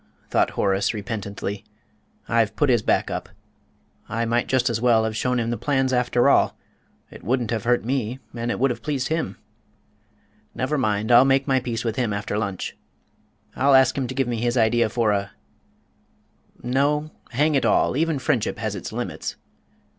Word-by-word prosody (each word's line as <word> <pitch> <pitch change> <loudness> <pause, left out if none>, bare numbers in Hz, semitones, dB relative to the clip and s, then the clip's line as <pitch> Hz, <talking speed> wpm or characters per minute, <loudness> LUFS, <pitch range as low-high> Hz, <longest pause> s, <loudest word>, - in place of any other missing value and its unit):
thought - - +3
Horace, 100 +2 +1
repentantly, 100 -2 -5 0.6
"I've - - +1
put - - +2
his - - +3
back - - +1
up. - - -4 0.8
I 115 +1 -1
might 120 +1 0
just 130 -2 +1
as 115 -2 -1
well 115 -2 +4
have 110 -1 -2
shown 125 +2 0
him 115 0 -1
the 120 - -3
plans, 135 -2 +1
after 125 0 +2
all; 140 - +3 0.5
it - - -12
wouldn't 120 0 0
have 110 -2 -2
hurt 120 -1 +2
me 125 -1 -1 0.2
and 120 0 -3
it - - -1
would 135 0 +3
have 120 - -6
pleased 140 -4 -2
him. 160 0 -2 1.2
Never 130 +4 -1
mind, 110 -4 0
I'll 120 +1 +8
make 135 +1 +2
my 135 -1 +3
peace 120 -1 -4
with 115 -1 -2
him 120 -5 0
after 100 0 -3
lunch. 100 -3 -3 0.8
I'll 135 +1 +4
ask 130 -1 +5
him 135 -3 -1
to 130 - -6
give 135 -1 0
me 120 -1 -2
his 120 +1 0
idea 115 0 +3
for 115 -1 +1
a 100 -1 -2 1.3
no, 145 +5 0 0.2
hang 150 +5 +1
it 135 - +2
all, - - +2
even 160 +1 +1
friendship 130 -4 0
has 110 -2 -3
its 100 - -6
limits!" - - -4
120 Hz, 180 wpm, -23 LUFS, 110-130 Hz, 1.3 s, I'll